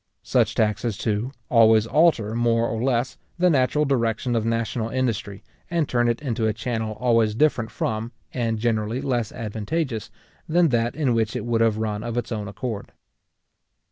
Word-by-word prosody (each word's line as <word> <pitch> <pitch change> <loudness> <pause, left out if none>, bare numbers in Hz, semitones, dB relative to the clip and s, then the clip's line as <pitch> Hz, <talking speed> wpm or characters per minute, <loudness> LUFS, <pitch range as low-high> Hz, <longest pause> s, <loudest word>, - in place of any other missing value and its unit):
Such - - +1
taxes, 110 0 0
too, 110 +3 -1 0.2
always 110 -2 +5
alter, 125 -5 +3
more 115 0 +2
or 115 -1 -3
less, 125 0 0 0.2
the 180 0 +4
natural 145 +1 +2
direction 120 -2 0
of 115 -1 0
national 115 0 -1
industry, 115 -6 -2 0.3
and 170 -4 0
turn 120 -1 +1
it 120 +5 -2
into 115 -4 0
a 110 - +1
channel 110 -1 -3
always 115 -3 +2
different 125 -4 +2
from, 110 +2 -3 0.2
and 115 -3 -1
generally 110 +1 0
less 125 -5 -1
advantageous, 115 - -3 0.4
than 170 0 +4
that 120 -1 0
in 140 -6 +1
which 110 -1 0
it - - -3
would 115 -1 +1
have 115 -2 +3
run 105 -1 -2
of 120 0 -4
its 120 0 -3
own 105 -3 -3
accord. 105 +2 -5
115 Hz, 170 wpm, -24 LUFS, 110-125 Hz, 0.4 s, always